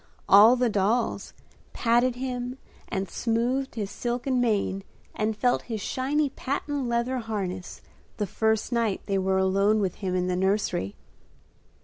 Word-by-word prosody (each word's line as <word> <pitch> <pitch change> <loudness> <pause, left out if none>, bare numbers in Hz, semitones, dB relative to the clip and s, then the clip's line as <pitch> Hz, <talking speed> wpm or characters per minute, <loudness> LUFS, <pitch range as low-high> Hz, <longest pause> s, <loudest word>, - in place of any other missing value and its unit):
All 215 +5 +8
the 250 0 +2
dolls 210 +3 0 0.4
patted 240 +1 +2
him 250 0 -4 0.3
and 195 -1 -2
smoothed 245 +7 -1
his 205 -3 -3
silken 245 +1 -1
mane 200 -4 0 0.3
and 215 0 -1
felt 245 +2 +2
his 220 -2 -2
shiny 275 +7 0
patent 280 0 -3
leather 235 +2 0
harness 195 -5 -5 0.3
the 210 - 0
first 220 +4 0
night 230 -4 0
they 195 -1 0
were 190 0 +1
alone 195 +3 +3
with 190 -4 -1
him 185 -2 -1
in 180 0 +1
the 180 0 0
nursery. 190 - 0
225 Hz, 140 wpm, -26 LUFS, 195-245 Hz, 0.4 s, All